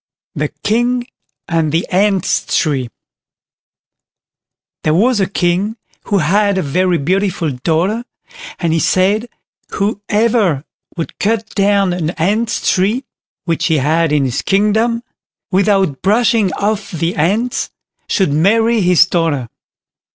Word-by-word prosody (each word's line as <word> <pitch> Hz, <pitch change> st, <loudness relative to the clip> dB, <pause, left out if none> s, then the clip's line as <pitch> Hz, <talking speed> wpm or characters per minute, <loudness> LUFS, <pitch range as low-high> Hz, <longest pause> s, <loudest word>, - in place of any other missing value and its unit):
THE -, -, -1 dB, 0.2 s
KING 240 Hz, +3 st, +1 dB, 0.4 s
AND 160 Hz, -2 st, 0 dB
THE 165 Hz, +3 st, 0 dB
ANT'S 195 Hz, 0 st, +1 dB
TREE 135 Hz, -6 st, 0 dB, 1.9 s
There 155 Hz, 0 st, +2 dB
was 230 Hz, +5 st, +3 dB
a 195 Hz, -, 0 dB
King 190 Hz, +4 st, 0 dB, 0.3 s
who 205 Hz, -, +1 dB
had 200 Hz, +4 st, +2 dB
a 190 Hz, -, 0 dB
very 180 Hz, +4 st, +1 dB
beautiful 180 Hz, 0 st, 0 dB
daughter, 165 Hz, -, -1 dB, 0.5 s
and 165 Hz, -2 st, 0 dB
he 165 Hz, -, +2 dB
said, 200 Hz, +8 st, +1 dB, 0.4 s
whoever 205 Hz, -, 0 dB, 0.3 s
would 165 Hz, -, -5 dB
cut 220 Hz, +1 st, 0 dB
down 200 Hz, -2 st, +2 dB
an 170 Hz, -3 st, -2 dB
Ant's 215 Hz, +7 st, 0 dB
tree, 210 Hz, +8 st, 0 dB, 0.4 s
which 165 Hz, -2 st, 0 dB
he 160 Hz, -2 st, +2 dB
had 155 Hz, +3 st, +1 dB
in 145 Hz, -2 st, +2 dB
his 125 Hz, -, -2 dB
kingdom, 220 Hz, +4 st, +1 dB, 0.5 s
without 195 Hz, -6 st, +1 dB
brushing 215 Hz, 0 st, +2 dB
off 210 Hz, 0 st, -2 dB
the 165 Hz, 0 st, -2 dB
ants, 205 Hz, +10 st, 0 dB, 0.4 s
should 190 Hz, -9 st, +1 dB
marry 225 Hz, +8 st, +3 dB
his 180 Hz, -1 st, +5 dB
daughter. 160 Hz, -9 st, -1 dB
190 Hz, 120 wpm, -16 LUFS, 165-215 Hz, 1.9 s, his